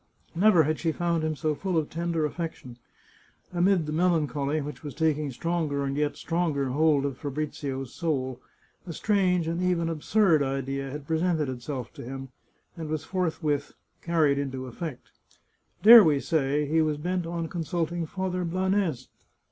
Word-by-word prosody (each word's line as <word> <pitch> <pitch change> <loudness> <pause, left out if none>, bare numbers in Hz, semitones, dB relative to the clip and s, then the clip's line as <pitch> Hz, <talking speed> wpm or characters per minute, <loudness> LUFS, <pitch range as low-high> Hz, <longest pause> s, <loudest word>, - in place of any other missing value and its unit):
Never 180 -1 +5
had 155 +1 -1
she 165 - 0
found 170 0 -1
him 155 0 -1
so 155 0 0
full 180 +3 -2
of 155 -2 +1
tender 165 -2 -1
aflfec 165 +2 -4
tion. 125 -1 -13 0.7
Amid 180 -1 +3
the 150 - -4
melancholy 155 -3 +1
which 150 0 -6
was 145 -3 -7
taking 155 -2 +1
stronger 150 0 -1
and 135 0 -2
yet 150 0 -1
stronger 160 -5 -1
hold 145 +1 +3
of 135 -3 -4
Fabrizio's 140 -3 -4
soul, 130 -7 -2 0.5
a 170 - -5
strange 180 -2 +1
and 170 +2 -1
even 175 -2 +1
absurd 165 +1 +3
idea 135 0 -2
had 145 +1 -7
presented 160 -2 0
itself 125 -1 -5
to - - -9
him, 135 +2 -7 0.5
and 160 -2 -6
was 155 -1 -2
forthwith 160 -6 -1 0.3
carried 155 -5 +2
into 130 -2 -4
effect. 130 +2 -7 0.7
Dare 230 +1 +11
we 150 -5 +3
say 145 -1 0
he 160 +3 +2
was 155 -1 0
bent 175 +2 -2
on 170 -1 -3
consulting 170 0 -2
Father 185 +1 -2
Blanes? 185 -5 0
155 Hz, 160 wpm, -27 LUFS, 140-170 Hz, 0.7 s, Dare